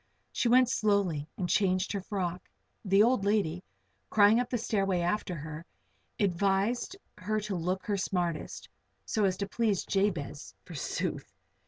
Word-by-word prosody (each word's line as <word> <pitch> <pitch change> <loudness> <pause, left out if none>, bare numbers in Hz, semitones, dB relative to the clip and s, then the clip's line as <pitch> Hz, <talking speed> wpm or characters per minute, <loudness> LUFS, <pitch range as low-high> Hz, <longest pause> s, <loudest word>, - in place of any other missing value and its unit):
She 240 - 0
went 255 +1 +6
slowly 200 -10 +1
and 180 - -1
changed 185 0 +1
her 200 - -2
frock. 180 -3 -4 0.3
The 195 0 +5
old 240 -3 +3
lady, 195 -4 +1 0.5
crying 210 +2 +5
up 245 - -1
the 245 - 0
stairway 195 -5 0
after 180 +1 -1
her, 155 +1 -7 0.6
advised 200 - +1 0.2
her 215 +4 -1
to 205 -1 -3
look 180 +2 -2
her 205 -1 0
smartest 175 -4 -2 0.4
so 215 -2 +1
as 185 -1 +1
to 200 - -2
please 210 -3 0
Jabez, 170 -8 -1
forsooth! 160 -6 -4
195 Hz, 145 wpm, -30 LUFS, 180-210 Hz, 0.6 s, went